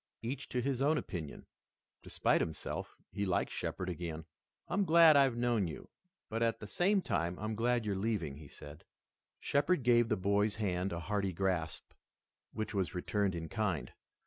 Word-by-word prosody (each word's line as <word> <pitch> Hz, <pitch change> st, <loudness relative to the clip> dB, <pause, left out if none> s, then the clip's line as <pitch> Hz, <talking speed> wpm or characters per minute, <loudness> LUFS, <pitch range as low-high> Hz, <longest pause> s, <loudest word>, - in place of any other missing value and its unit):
Each 130 Hz, +4 st, -4 dB
to 125 Hz, -, -1 dB
his 135 Hz, -1 st, -1 dB
own 150 Hz, +3 st, +3 dB
opinion. 80 Hz, -, -5 dB, 0.6 s
Despite -, -, +1 dB
himself, 80 Hz, -2 st, -4 dB
he 100 Hz, -, -2 dB
liked 95 Hz, -3 st, 0 dB
Shepard 95 Hz, -, -3 dB
again. 85 Hz, -3 st, -4 dB, 0.4 s
"I'm 200 Hz, +2 st, +1 dB
glad 165 Hz, -3 st, +7 dB
I've 135 Hz, -4 st, +4 dB
known 120 Hz, -5 st, +1 dB
you, 80 Hz, -, -8 dB, 0.4 s
but 115 Hz, +1 st, -3 dB
at 115 Hz, -1 st, +1 dB
the -, -, -7 dB
same 190 Hz, -, +2 dB
time 85 Hz, +2 st, -1 dB
I'm 110 Hz, +1 st, -3 dB
glad 120 Hz, +1 st, +1 dB
you're 100 Hz, -2 st, 0 dB
leaving," 95 Hz, -9 st, -2 dB
he 75 Hz, -1 st, -11 dB
said. 75 Hz, +2 st, -12 dB, 0.6 s
Shepard 145 Hz, +1 st, +1 dB
gave 120 Hz, -1 st, +4 dB
the -, -, +2 dB
boy's 100 Hz, +2 st, +1 dB
hand 95 Hz, -3 st, -1 dB
a 85 Hz, 0 st, -3 dB
hearty 100 Hz, +1 st, -1 dB
grasp, 90 Hz, -3 st, -2 dB, 0.6 s
which 110 Hz, +1 st, -4 dB
was 95 Hz, -2 st, -1 dB
returned 100 Hz, +1 st, 0 dB
in 80 Hz, -1 st, -4 dB
kind. 95 Hz, -5 st, -2 dB
105 Hz, 170 wpm, -33 LUFS, 90-120 Hz, 0.6 s, glad